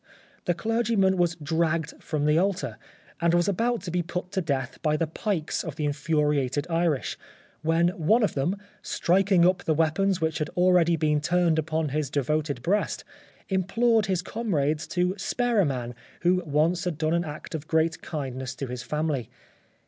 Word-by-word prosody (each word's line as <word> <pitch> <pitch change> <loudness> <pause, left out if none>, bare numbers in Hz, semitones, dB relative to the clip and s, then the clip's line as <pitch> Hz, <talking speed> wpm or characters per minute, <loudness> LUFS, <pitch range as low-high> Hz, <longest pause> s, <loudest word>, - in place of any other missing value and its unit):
The 175 - +1
clergyman 220 -2 +2
was 175 -2 +1
dragged 160 0 -1
from 150 -2 -2
the 150 +2 +4
altar, 175 - -1 0.4
and 170 0 +3
was 175 +1 +2
about 230 +2 0
to 175 - -5
be 180 +1 +1
put 180 +1 -5
to 195 -2 0
death 135 -6 -2
by 155 -2 +1
the 165 - +1
pikes 165 0 -2
of 160 -5 -6
the 150 - -2
infuriated 145 -2 0
Irish, 165 -4 0 0.4
when 165 +2 +3
one 180 +7 +2
of 210 - +1
them, 150 +9 0 0.2
striking 185 0 +3
up 180 0 +3
the 160 - +1
weapons 170 +4 +2
which 160 -1 -1
had 155 +1 -2
already 180 -2 +4
been 150 -2 +1
turned 170 0 +2
upon 160 0 -1
his 145 0 -1
devoted 145 -1 -1
breast, 200 +8 0 0.4
implored 220 +4 +2
his 185 -2 0
comrades 155 -10 -1
to 180 +1 0
spare 245 +2 0
a 195 - +5
man 125 -4 -3 0.3
who 180 +1 +3
once 160 +5 +1
had 175 -4 -2
done 155 +1 0
an 170 0 +2
act 155 0 -8
of 155 -1 -5
great 160 0 +1
kindness 130 -4 -5
to 135 - -4
his 125 -1 -5
family. 150 -3 -2
165 Hz, 175 wpm, -26 LUFS, 150-180 Hz, 0.4 s, a